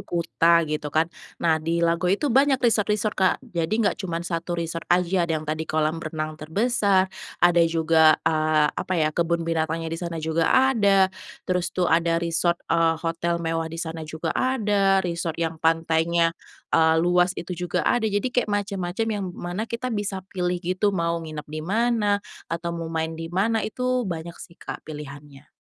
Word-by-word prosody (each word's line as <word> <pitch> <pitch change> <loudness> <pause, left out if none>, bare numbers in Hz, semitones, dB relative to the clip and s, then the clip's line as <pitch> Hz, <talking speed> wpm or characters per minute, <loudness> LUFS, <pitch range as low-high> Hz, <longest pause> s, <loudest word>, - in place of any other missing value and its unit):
Kuta 170 0 +2
gitu 150 -1 -3
kan. 160 +3 0 0.2
Nah 160 -2 +1
di 170 +2 0
Lago 170 +2 +1
itu 230 +9 +1
banyak 270 +1 +4
resort-resort 215 -3 +1
Kak, 185 -1 +2
jadi 170 -9 -2
gak 215 -1 0
cuman 170 -3 -3
1 170 0 -3
resort 165 0 -4
aja 175 0 +2
ada 160 - +1
yang 155 - -6
tadi 155 +1 -3
kolam 155 +1 0
renang 155 -1 -4
terbesar, 195 +2 +1 0.2
ada 175 0 +4
juga, 160 -1 +4
eee, 155 -1 +3
apa - - -4
ya 155 -2 +1
kebun 170 +1 0
binatangnya 165 0 -1
di 165 - -3
sana 170 -2 -4
juga 160 +1 0
ada, 200 -8 +4 0.3
terus 180 -1 0
tuh 180 - -1
ada 165 0 +2
resort, 170 +1 +1
eee, 165 -1 +2
hotel 170 +1 -1
mewah 165 -1 -2
di 165 - -8
sana 165 -1 -5
juga 160 0 -4
ada 205 -7 +2
resort 170 -2 -3
yang 165 -1 -3
pantainya, 165 +1 +2 0.4
eee, 160 0 +4
luas 180 +2 +2
itu 175 +2 -5
juga 180 0 -2
ada, 235 -3 +2
jadi 205 -1 -1
kayak 245 -3 +1
macem-macem 200 -1 -2 0.2
yang - - -3
mana 180 +6 -4
kita 240 +1 -3
bisa 205 -3 -3
pilih 180 -1 -1
gitu 190 +3 0
mau 170 -1 0
nginep 155 -2 -7
di 155 +1 -6
mana, 205 +2 +1 0.2
atau 170 +1 -3
mau 165 -1 -5
main 160 0 -2
di 165 0 -6
mana 205 +6 +1
itu 250 0 -1
banyak 170 -1 -5
sih 170 - -12
Kak - - -7
pilihannya. 145 -2 -10
170 Hz, 175 wpm, -24 LUFS, 160-195 Hz, 0.4 s, banyak